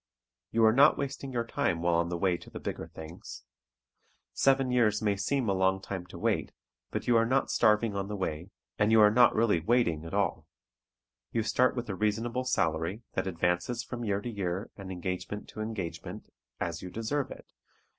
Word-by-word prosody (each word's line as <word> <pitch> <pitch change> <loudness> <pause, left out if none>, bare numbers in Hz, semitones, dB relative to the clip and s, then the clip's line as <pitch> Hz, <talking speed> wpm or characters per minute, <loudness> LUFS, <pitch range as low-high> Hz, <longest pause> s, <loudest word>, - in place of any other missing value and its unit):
You 115 0 +3
are 110 - +6
not 135 +4 +6
wasting 135 -1 -4
your 120 -2 -1
time 85 -7 -1
while 85 0 +2
on 85 +1 +1
the 85 - -2
way 90 0 +2
to - - -11
the - - -8
bigger - - -5
things. 80 +2 -10 0.9
Seven 135 -1 +3
years 110 -4 +3
may 105 -2 +1
seem 120 +5 0
a 100 - +2
long 95 0 +2
time 95 -2 -6
to - - -10
wait, - - -1 0.4
but - - -4
you 120 - +3
are 115 - +4
not 135 +2 +1
starving 105 0 +3
on 100 0 -2
the 105 - -4
way, 90 -2 -3 0.3
and 105 +1 +3
you 110 - +6
are 105 -1 +7 0.2
really 110 -6 +2
not 80 - -14
"waiting" 115 -11 +2
at 80 - -6
all. - - 0 0.8
You 115 - 0
start 125 +4 +2
with 120 -1 -3
a 100 - -3
reasonable 115 +5 -1
salary 85 -2 0
that 95 - -1
advances 90 +7 0
from 120 0 -6
year 100 -2 0
to 120 - -5
year 95 -1 -3
and 95 -2 -8
engagement 90 +3 -4
to 110 - -7
engagement, 110 -6 -5 0.3
as - - -3
you 90 - -6
deserve 115 +8 -2
it. - - -12
105 Hz, 195 wpm, -30 LUFS, 90-115 Hz, 0.9 s, are